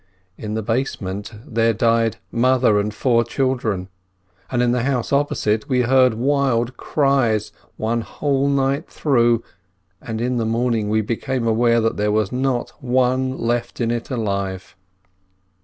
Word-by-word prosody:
In 105 +1 -5
the 110 - -2
basement 105 -4 -3
there 115 0 +1
died 115 0 +2
a - - -21
mother 125 -3 +3
and 105 +1 -1
four 115 +1 +2
children, 120 -6 -1 0.6
and 125 -1 +1
in 120 - +2
the 125 0 +1
house 125 -2 -1
oppo 145 +1 +1
site 105 +3 0
we 125 -2 +2
heard 130 -1 +4
wild 130 -1 +1
cries 125 -7 +1 0.3
one 115 +2 -1
whole 140 +3 -1
night 140 0 0
through, 120 -5 +2 0.6
and 110 -1 -5
in 125 +1 -1
the 115 - 0
morning 115 -2 0
we 110 +1 +2
became 120 +3 -2
aware 115 +1 +3
that 115 0 0
there 105 0 +1
was 105 -2 +1
no 125 -1 0
one 130 +1 +1
left 120 +1 -2
in 115 -1 0
it 120 -1 -3
alive. 100 -7 -3
120 Hz, 155 wpm, -21 LUFS, 110-130 Hz, 0.6 s, heard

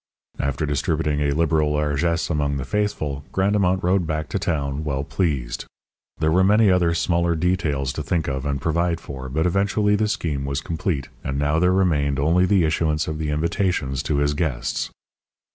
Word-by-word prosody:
After 70 +3 -1
distributing 75 +1 0
a 75 -1 +1
liberal 80 -2 +2
largesse 75 +3 0
among 70 -2 0
the 65 - -4
faithful, 75 -7 -2
Grandemont 95 -1 +1
rode 90 -1 +2
back 75 -2 -2
to - - -1
town 70 -2 -2
well 70 -2 -2
pleased. 70 -8 -2 0.5
There 80 0 +1
were 90 +3 +4
many 105 +1 +5
other 85 -2 +2
smaller 85 0 +1
details 80 -6 0
to 75 - -4
think 80 +1 -1
of 65 -1 -2
and 70 -1 -1
provide 85 +3 0
for, 65 -4 -7
but 80 +5 0
eventually 100 +3 +2
the 105 +1 +1
scheme 75 -9 -2
was 70 0 -2
complete, 80 -4 -3
and 70 0 -2
now 75 +2 +1
there 90 +1 +3
remained 75 -7 +2
only 85 +6 +3
the 95 -2 +3
issuance 80 -1 0
of 80 0 -3
the 75 -1 -2
invitations 75 -3 0
to 75 0 -1
his 70 0 +2
guests. 75 -5 -2
80 Hz, 180 wpm, -23 LUFS, 70-90 Hz, 0.5 s, many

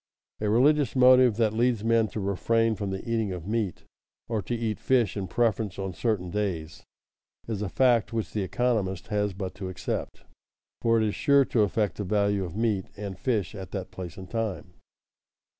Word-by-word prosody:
A 105 - 0
religious 135 +4 +3
motive 125 -2 +6
that 110 -2 +2
leads 115 -1 +1
men 115 -1 +3
to 110 - -5
refrain 115 +4 +1
from 100 -2 -4
the 95 +4 -5
eating 110 -3 0
of 90 -3 -6
meat 105 -5 -2 0.4
or 110 -2 -1
to 120 - -3
eat 115 -2 -2
fish 120 -7 +2
in 100 -2 -3
preference 110 -4 0
on 95 -1 -4
certain 90 -2 -1
days, 85 -7 -3 0.6
is 110 -3 -3
a 105 - -2
fact 120 -1 +3
which 115 -2 -3
the 105 - -1
economist 100 -2 -1
has 105 -2 0
but 95 -1 -5
to 95 -2 -6
accept, 95 - -4 0.6
for 115 -1 +3
it 110 - +2
is 105 - -1
sure 140 -1 +4
to 115 - +1
affect 105 0 0
the 105 - -2
value 100 0 +1
of 90 -1 -6
meat 110 -5 0
and 100 -2 -6
fish 110 -10 -1
at 95 -3 -7
that 95 -3 -4
place 90 -3 -7
and 95 -1 -10
time. 110 -5 -3
105 Hz, 190 wpm, -27 LUFS, 95-115 Hz, 0.6 s, motive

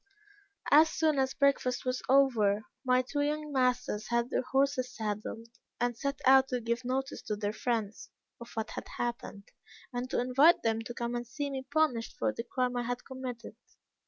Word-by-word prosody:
"As 310 +2 +7
soon 310 -4 +1
as 265 0 0
breakfast 270 -3 +1
was 255 0 -1
over, 220 -7 +3 0.2
my 255 -1 +3
two 290 +3 -2
young 300 +1 -1
masters 250 -5 0
had 235 +1 0
their - - +1
horses 260 -1 0
saddled, 220 +1 -4 0.3
and 240 0 0
set 280 +3 -3
out 265 0 +7
to 250 -2 -1
give 235 +1 -2
notice 265 +2 -2
to 210 - -3
their 205 0 -2
friends 225 -3 -3 0.3
of 235 - -10
what 220 0 -3
had - - -6
happened, 235 -4 -4 0.4
and 245 +1 -3
to - - 0
invite 270 +7 +4
them 225 0 +1
to 240 +1 -7
come 235 0 -3
and 240 0 -3
see 285 +4 -4
me 265 -1 -5
punished 300 -8 +1
for - - 0
the 230 - -5
crime 250 +1 -1
I - - +1
had 245 +1 -4
committed. 255 -3 -7
250 Hz, 185 wpm, -30 LUFS, 235-270 Hz, 0.4 s, As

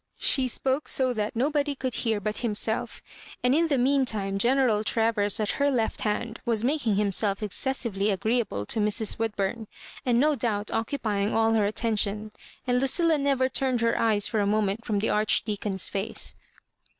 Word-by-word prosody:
She 265 -2 +2
spoke 265 +3 -1
so 255 -2 +1
that 215 +2 -3
nobody 285 +3 0
could 260 -2 -3
hear 225 -3 -1
but 210 +1 -3
himself; 220 -1 -1 0.4
and 250 +1 +3
in 330 +3 +3
the 285 -4 +1
mean 270 +2 +3
time 195 -5 -2
General 240 -2 +2
Travers 220 -2 +1
at 210 -1 +1
her 285 - +4
left 235 -5 -1
hand 220 +2 -2
was 230 -2 0
making 255 -5 +1
himself 200 0 0
excessively 210 -2 -1
agreeable 210 - -1
to 220 - -1
Mrs. 210 +1 +1
Woodbura, 220 0 -2 0.4
and 245 -3 +2
no 300 +3 +3
doubt 220 -5 -2
occupying 220 -4 -1
all 225 0 +3
her 215 -2 +2
atten 220 +2 -1
tion; 210 +1 0 0.3
and 250 -1 +1
Lucilla 315 +4 +2
never 275 -2 +1
tumed 260 -2 0
her 230 0 +2
eyes 215 -3 +2
for 220 - -1
a 200 - +1
moment 210 +1 0
from 215 -3 -1
the 210 +3 0
Archdeacon's 210 -2 +1
face. 195 +1 -2
225 Hz, 175 wpm, -26 LUFS, 210-255 Hz, 0.4 s, her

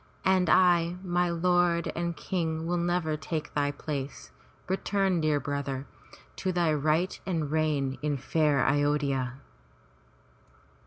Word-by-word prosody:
And 185 -2 +3
I, 175 -2 +4
my 175 -1 +1
lord 175 0 +2
and 170 -1 -2
King, 160 -3 -2
will 175 +1 0
never 170 -2 0
take 155 0 -4
thy 145 -1 +1
place. 145 -1 -5 0.4
Return, 190 -1 0
dear 155 -2 +2
brother, 140 -2 -3 0.5
to 190 - -1
thy 170 -3 +2
rights 155 +5 +1
and 160 -6 -2
reign 145 -4 0
in 145 -1 0
fair 150 0 +1
A 145 +2 +3
yod'hya!" 140 -4 0
160 Hz, 125 wpm, -28 LUFS, 145-175 Hz, 0.5 s, I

